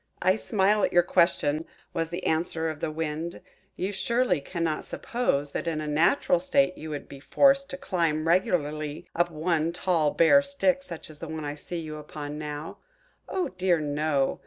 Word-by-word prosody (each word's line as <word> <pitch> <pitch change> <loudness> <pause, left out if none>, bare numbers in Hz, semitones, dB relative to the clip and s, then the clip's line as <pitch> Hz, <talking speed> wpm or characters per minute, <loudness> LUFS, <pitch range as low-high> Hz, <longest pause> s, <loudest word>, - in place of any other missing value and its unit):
"I 185 +1 +3
smile 210 -1 +2
at - - +2
your 175 - +5
question," 160 -3 +2 0.3
was 165 0 -1
the 175 +2 -5
answer 160 0 0
of 155 - -9
the - - -2
Wind. 160 +2 -4 0.4
"You 190 +2 -2
surely 200 - +1
cannot 165 0 -2
suppose 145 - -1
that 170 - -3
in 160 -2 -1
a 155 - -3
natural 170 - +3
state 275 -8 +2
you 155 - -8
would 145 -2 -5
be 140 - -10
forced 275 - +3
to 275 - -5
climb 165 - 0
regularly 155 -4 0
up 175 +1 +2
one 160 0 0
tall 170 -3 +1
bare 170 - +5
stick 280 -1 +1
such 170 - -9
as 150 - -11
I 155 -3 -4
see 165 +4 -7
you 155 -2 -5
upon 150 0 -7
now. 150 +1 -6 0.5
Oh 370 - -1
dear, 185 -2 +1
no! 145 -2 0
165 Hz, 175 wpm, -27 LUFS, 155-185 Hz, 0.5 s, your